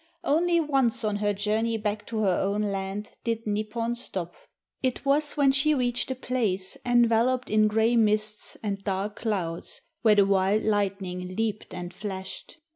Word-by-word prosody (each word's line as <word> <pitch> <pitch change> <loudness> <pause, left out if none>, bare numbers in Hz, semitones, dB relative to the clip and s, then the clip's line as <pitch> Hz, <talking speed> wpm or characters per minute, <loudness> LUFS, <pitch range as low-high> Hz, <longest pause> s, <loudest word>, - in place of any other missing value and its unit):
Only 340 +3 +3
once 270 -6 +2
on 210 -1 0
her 205 0 +1
journey 215 +3 0
back 210 -1 -3
to 220 -1 -2
her 190 -4 +2
own 200 +2 0
land 200 +1 -3
did 230 -1 -2
Nipon 215 +3 -1
stop. 185 -8 -4 0.5
It 260 +1 -1
was 290 +2 +2
when 280 -2 +5
she 295 +3 +3
reached 245 -2 0
a 260 - -1
place 220 -8 -1
enveloped 240 +1 +2
in 215 0 +4
grey 220 +2 +2
mists 215 -1 0
and 200 -2 -3
dark 200 +1 -2
clouds 185 -7 -3 0.2
where 220 -2 +5
the 200 -1 +5
wild 195 +2 +2
lightning 190 -3 -1
leaped 220 -1 -2
and 180 0 -6
flashed. 190 - -7
215 Hz, 160 wpm, -27 LUFS, 200-240 Hz, 0.5 s, when